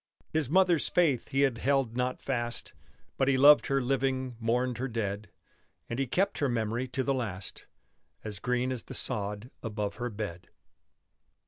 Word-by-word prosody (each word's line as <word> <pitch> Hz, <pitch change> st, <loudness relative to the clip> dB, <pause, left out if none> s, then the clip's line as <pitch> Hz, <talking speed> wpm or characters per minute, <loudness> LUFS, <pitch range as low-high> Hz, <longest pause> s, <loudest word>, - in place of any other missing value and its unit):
His 155 Hz, -5 st, +1 dB
mother's 180 Hz, -1 st, +4 dB
faith 155 Hz, -9 st, +2 dB
he 135 Hz, -, +1 dB
held 135 Hz, -2 st, +1 dB
not 125 Hz, +1 st, -1 dB
fast; 120 Hz, -3 st, -2 dB, 0.4 s
But 135 Hz, -, +2 dB
he 135 Hz, -1 st, +4 dB
loved 145 Hz, +2 st, +7 dB
her 135 Hz, -1 st, +2 dB
living, 130 Hz, -1 st, 0 dB
mourned 120 Hz, +1 st, 0 dB
her 130 Hz, -, -1 dB
dead, 105 Hz, -4 st, -3 dB, 0.6 s
And 120 Hz, -, -2 dB
he 135 Hz, -, 0 dB
kept 195 Hz, +10 st, 0 dB
her 140 Hz, -, +1 dB
memory 115 Hz, +1 st, -1 dB
to 130 Hz, +1 st, -2 dB
the 135 Hz, -, +1 dB
last 100 Hz, -7 st, -5 dB, 0.6 s
As 105 Hz, -2 st, -5 dB
green 125 Hz, +3 st, 0 dB
as 125 Hz, -3 st, -3 dB
the -, -, -7 dB
sod 105 Hz, 0 st, -2 dB
above 105 Hz, -3 st, -3 dB
her 120 Hz, 0 st, -2 dB
bed. 100 Hz, -6 st, -6 dB
125 Hz, 160 wpm, -30 LUFS, 115-135 Hz, 0.6 s, loved